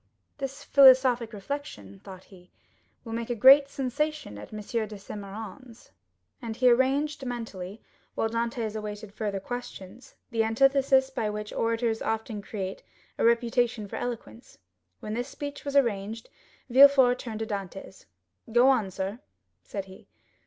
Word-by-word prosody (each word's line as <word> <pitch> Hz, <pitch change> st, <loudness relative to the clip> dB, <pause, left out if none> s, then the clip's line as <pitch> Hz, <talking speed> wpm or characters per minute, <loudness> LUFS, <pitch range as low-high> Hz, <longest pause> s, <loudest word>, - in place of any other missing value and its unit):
"This 270 Hz, 0 st, -5 dB
philosophic 260 Hz, -4 st, +6 dB
reflection," 200 Hz, -, -7 dB
thought 190 Hz, -1 st, -11 dB
he, 180 Hz, -2 st, -18 dB, 0.6 s
"will 225 Hz, -, -6 dB
make 230 Hz, +1 st, -4 dB
a 240 Hz, -, -1 dB
great 275 Hz, +5 st, +7 dB
sensation 275 Hz, -, -3 dB
at 105 Hz, -, -11 dB
M. 215 Hz, -, -6 dB
de 215 Hz, 0 st, -3 dB
Saint 205 Hz, +1 st, -8 dB
Méran's;" 225 Hz, +4 st, -10 dB, 0.5 s
and 230 Hz, -2 st, -5 dB
he 250 Hz, +1 st, +4 dB
arranged 275 Hz, +4 st, +1 dB
mentally, 225 Hz, -5 st, -6 dB, 0.3 s
while -, -, 0 dB
Dantès 230 Hz, -1 st, -2 dB
awaited 210 Hz, -1 st, -6 dB
further 205 Hz, -2 st, -3 dB
questions, 245 Hz, -1 st, -8 dB, 0.2 s
the 225 Hz, -1 st, +1 dB
antithesis 265 Hz, +3 st, +3 dB
by 220 Hz, -5 st, -2 dB
which 210 Hz, 0 st, -5 dB
orators 230 Hz, 0 st, 0 dB
often 220 Hz, -1 st, -3 dB
create 195 Hz, -2 st, -5 dB, 0.4 s
a -, -, +1 dB
reputation 235 Hz, -1 st, +2 dB
for -, -, -6 dB
eloquence. 220 Hz, -, -7 dB, 0.4 s
When 215 Hz, -, -5 dB
this 245 Hz, +3 st, -2 dB
speech 285 Hz, +1 st, -7 dB
was 280 Hz, -1 st, -4 dB
arranged, 225 Hz, -4 st, 0 dB, 0.4 s
Villefort 260 Hz, -1 st, +6 dB
turned 225 Hz, -2 st, -6 dB
to -, -, -1 dB
Dantès. 195 Hz, -3 st, -7 dB, 0.4 s
0099m -, -, -11 dB
"Go 245 Hz, +3 st, +6 dB
on, 235 Hz, -7 st, +2 dB
sir," 190 Hz, +4 st, -4 dB, 0.4 s
said 195 Hz, -2 st, -6 dB
he. 190 Hz, 0 st, -15 dB
230 Hz, 145 wpm, -27 LUFS, 205-260 Hz, 0.6 s, great